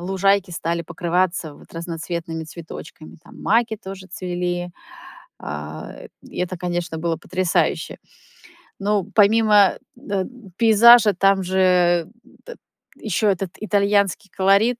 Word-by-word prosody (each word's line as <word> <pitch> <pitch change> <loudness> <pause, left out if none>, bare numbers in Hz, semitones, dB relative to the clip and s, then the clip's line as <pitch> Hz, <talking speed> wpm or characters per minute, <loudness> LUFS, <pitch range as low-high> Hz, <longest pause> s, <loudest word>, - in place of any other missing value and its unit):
лужайки 195 +1 +1
стали 170 0 -2
покрываться 170 -2 -1
вот - - -18
разноцветными 165 -1 -5
цветочками. 160 -1 -11
Там - - -14
маки 225 +1 +2
тоже 190 -2 -9
цвели. 175 -1 -3 0.7
Э. 75 +1 -8
И - - -11
это, 180 0 -2
конечно, 175 -2 -3
было 165 0 -1
потрясающе. 185 0 -1 0.8
Но 200 -1 0
помимо 210 -2 +5 0.2
дет 195 -2 -3 0.3
пейзажа, 225 -1 +7
там 195 +1 +2
же 180 -2 +2 0.9
ещё 215 - -1
этот 190 -2 -1
итальянский 200 -1 +1
колорит, 200 +6 +3
185 Hz, 105 wpm, -21 LUFS, 170-200 Hz, 0.9 s, пейзажа